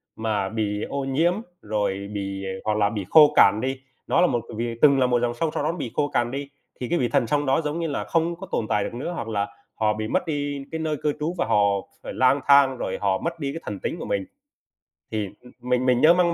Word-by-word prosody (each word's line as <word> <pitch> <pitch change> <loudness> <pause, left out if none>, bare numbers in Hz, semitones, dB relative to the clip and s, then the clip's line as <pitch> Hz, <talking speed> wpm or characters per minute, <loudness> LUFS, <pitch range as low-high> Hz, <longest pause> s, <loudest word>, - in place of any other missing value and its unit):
mà 105 -3 -1
bị 105 -1 -2
ô 140 0 -2
nhiễm 155 +6 +2 0.3
rồi 100 -2 -2
bị, 100 -1 -4
à 95 - -3
hoặc 105 -1 +1
là 105 -1 +3
bị 105 -3 -4
khô 150 -2 +7
cạn 100 +2 +6
đi, 130 0 -3 0.3
nó - - +3
là 180 - +5
một 120 - 0 0.2
vị 115 0 -2
từng 140 -2 +6
là 130 - +4
một 120 -1 +2
dòng 120 -1 0
sông 160 +7 -1
sau - - -1
đó 155 - +1
nó 170 - -7
bị 125 -8 -4
khô 145 - +2
cằn 120 0 0
đi, 140 +1 -5 0.3
thì 125 - -4
cái 175 - +1
vị 120 -3 +1
thần 115 - +2
sông 145 +2 +1
đó, 135 +4 +2
giống 150 +1 -3
như 165 - -1
là, 145 - -2
không 165 +1 0
có 190 +3 -9
tồn 110 - -1
tại 105 - +2
được - - -5
nữa, 130 +8 -4
hoặc 115 - -4
là 100 -2 -1 0.3
họ 110 -1 +1
bị 110 0 -4
mất - - 0
đi 145 -2 -3
cái 160 - -3
nơi 155 -1 -1
cư 150 - +1
trú 155 +3 -1
và 175 - +1
họ - - +2 0.5
phải - - -6
lang 130 +2 +3
thang 140 -2 +6
rồi 95 - -3
họ 95 -2 +2
mất 170 - -4
đi 140 -2 -3
cái 165 - -6
thần 100 -1 -5
tính - - -3
của - - -5
mình. 100 -1 -1 0.9
Thì, 105 -2 -1
ừm, 125 - -15
mình 125 +1 0
mình 125 -1 +3
nhớ 160 +2 +7
mang 175 -1 +2
125 Hz, 270 wpm, -24 LUFS, 110-150 Hz, 0.9 s, khô